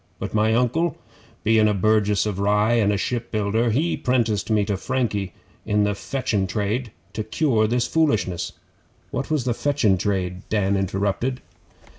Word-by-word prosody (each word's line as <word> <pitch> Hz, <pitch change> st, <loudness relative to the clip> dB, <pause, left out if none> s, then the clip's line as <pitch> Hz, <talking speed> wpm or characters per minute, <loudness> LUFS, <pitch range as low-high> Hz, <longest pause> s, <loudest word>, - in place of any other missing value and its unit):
But -, -, -5 dB
my 110 Hz, +1 st, +3 dB
Uncle, 125 Hz, +8 st, +1 dB, 0.5 s
bein' 110 Hz, -1 st, +4 dB
a 105 Hz, -, +1 dB
burgess 105 Hz, 0 st, +2 dB
of 100 Hz, -3 st, -3 dB
Rye, 105 Hz, +3 st, +2 dB
and 110 Hz, -3 st, +3 dB
a 100 Hz, -, +1 dB
shipbuilder, 115 Hz, 0 st, -1 dB
he 150 Hz, +10 st, +1 dB
'prenticed 115 Hz, -5 st, 0 dB
me 105 Hz, -2 st, +2 dB
to 100 Hz, -1 st, -1 dB
Frankie 105 Hz, -4 st, -2 dB, 0.3 s
in 105 Hz, -1 st, +1 dB
the 105 Hz, 0 st, +1 dB
fetchin' 105 Hz, -3 st, -2 dB
trade, 105 Hz, +6 st, -2 dB, 0.2 s
to 110 Hz, 0 st, -3 dB
cure 110 Hz, -1 st, +1 dB
this 120 Hz, +2 st, +1 dB
foolishness.' 110 Hz, -, 0 dB, 0.6 s
'What -, -, -3 dB
was 155 Hz, -4 st, +1 dB
the 125 Hz, -1 st, 0 dB
fetchin' 115 Hz, -8 st, +1 dB
trade?' 90 Hz, -3 st, -1 dB
Dan 100 Hz, -2 st, +1 dB
interrupted. 100 Hz, +6 st, -1 dB
110 Hz, 155 wpm, -23 LUFS, 100-120 Hz, 0.6 s, bein